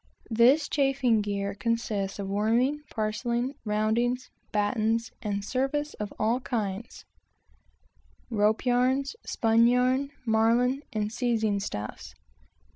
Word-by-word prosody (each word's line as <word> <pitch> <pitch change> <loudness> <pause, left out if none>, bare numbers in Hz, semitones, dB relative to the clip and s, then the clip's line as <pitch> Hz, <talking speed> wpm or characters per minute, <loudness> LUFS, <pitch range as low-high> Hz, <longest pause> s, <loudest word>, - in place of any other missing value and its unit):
This 255 +7 +5
chafing 270 -5 +2
gear 200 -1 -2
consists 210 -2 -2
of 200 -1 -4
worming, 230 +8 +1
parcelling, 235 +4 -1
roundings, 230 +4 0 0.2
battens, 220 +2 0
and 205 -2 -3
service 275 +5 -1
of 210 -1 -5
all 225 +4 +1
kinds 220 -4 -4 1.2
both 225 -4 -4
rope 215 +4 +2
yarns, 255 - +2
spun 230 0 +3
yarn, 255 +3 +2 0.2
marline 235 +4 +2
and 215 0 -2
seizing 225 -4 0
stuffs. 105 - -6
230 Hz, 110 wpm, -27 LUFS, 210-250 Hz, 1.2 s, This